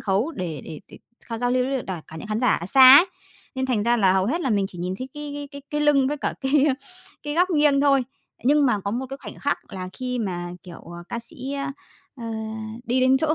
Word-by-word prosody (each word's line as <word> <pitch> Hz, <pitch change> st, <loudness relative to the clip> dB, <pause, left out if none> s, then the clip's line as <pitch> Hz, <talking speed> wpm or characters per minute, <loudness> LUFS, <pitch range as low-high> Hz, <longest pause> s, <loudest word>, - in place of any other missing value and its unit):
khấu 205 Hz, +10 st, 0 dB
để 170 Hz, -, -5 dB
để 155 Hz, -, -8 dB
để -, -, -13 dB, 0.3 s
họ 230 Hz, -1 st, -4 dB
giao 245 Hz, 0 st, 0 dB
lưu 250 Hz, 0 st, +2 dB
với 270 Hz, +1 st, -1 dB
đ -, -, -14 dB
đả 180 Hz, -5 st, -5 dB
cả 160 Hz, -, -10 dB
những 160 Hz, -, -7 dB
khán 215 Hz, +2 st, -1 dB
giả 250 Hz, -, +3 dB
ở 170 Hz, -, -4 dB
xa 260 Hz, +5 st, +9 dB
ấy, 355 Hz, -, +7 dB, 0.5 s
nên 260 Hz, 0 st, -1 dB
thành 240 Hz, -5 st, 0 dB
ra 235 Hz, +2 st, +3 dB
là 190 Hz, -4 st, +4 dB
hầu 190 Hz, 0 st, +2 dB
hết 330 Hz, +8 st, 0 dB
là 265 Hz, -, -1 dB
mình 200 Hz, -3 st, +2 dB
chỉ 175 Hz, -, -12 dB
nhìn 180 Hz, +2 st, -3 dB
thấy 260 Hz, +1 st, -5 dB
cái 295 Hz, -1 st, -6 dB
cái 290 Hz, 0 st, -6 dB
cái 280 Hz, -1 st, -10 dB
cái 295 Hz, 0 st, -1 dB
lưng 280 Hz, -3 st, +4 dB
với 295 Hz, -, -2 dB
cả 285 Hz, -, -2 dB
cái, 275 Hz, +1 st, +3 dB
a, 260 Hz, -, +2 dB, 0.5 s
cái 295 Hz, 0 st, -4 dB
góc 360 Hz, +2 st, +3 dB
nghiêng 295 Hz, -4 st, +4 dB
thôi. 275 Hz, -3 st, +3 dB, 0.4 s
Nhưng 290 Hz, +1 st, +4 dB
mà 215 Hz, -5 st, +1 dB
có 200 Hz, +1 st, -3 dB
một 255 Hz, +4 st, -3 dB
cái 270 Hz, -, -5 dB
khoảnh -, -, -8 dB
khắc 285 Hz, -, 0 dB
là 185 Hz, -1 st, -5 dB
khi 250 Hz, -1 st, -3 dB
mà, 175 Hz, -5 st, -3 dB
kiểu, 175 Hz, -2 st, -10 dB
ờ, 175 Hz, 0 st, -10 dB
ca 235 Hz, -, -3 dB
sĩ, 255 Hz, +3 st, -7 dB
ơ, 275 Hz, 0 st, -3 dB, 0.5 s
ờ, 235 Hz, -, -8 dB, 0.6 s
đi 250 Hz, +2 st, +1 dB
đến 260 Hz, +1 st, +5 dB
chỗ 310 Hz, +2 st, +1 dB
255 Hz, 270 wpm, -24 LUFS, 200-280 Hz, 0.6 s, xa